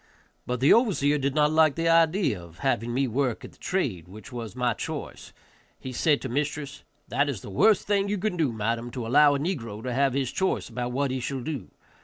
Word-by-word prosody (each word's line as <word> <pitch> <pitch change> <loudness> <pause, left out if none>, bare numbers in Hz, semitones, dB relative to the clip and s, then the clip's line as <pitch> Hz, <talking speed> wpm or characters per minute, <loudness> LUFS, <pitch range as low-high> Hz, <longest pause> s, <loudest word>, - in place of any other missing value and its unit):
But 125 0 -2
the 140 - +6
overseer 165 - +2
did 140 0 -1
not 150 0 +3
like 155 -2 +4
the 165 0 -1
idea 165 - +3
of 85 -1 -15
having 115 +3 0
me 135 +2 +1
work 125 0 -1
at - - -11
the - - -24
trade 115 - -2
which 110 +8 -12
was 120 -2 -6
my 125 -2 +1
choice. - - -6 0.5
He 130 - -7
said 145 +3 +2
to - - -2
mistress, 145 +2 -3 0.3
"That 145 0 +1
is 120 -9 -4
the - - -9
worst 210 - +4
thing 200 -1 +1
you 205 - 0
can 210 0 -1
do, 155 -7 +1
madam, 115 +2 -2
to 125 -3 -4
allow 145 +4 +5
a - - -1
negro 115 - -4
to 125 - -3
have 135 0 +2
his 135 -3 -1
choice 190 -8 -1
about 125 +1 -4
what 135 +1 0
he 130 - -2
shall 130 +1 -3
do. 140 -7 -5
135 Hz, 225 wpm, -26 LUFS, 120-155 Hz, 0.5 s, the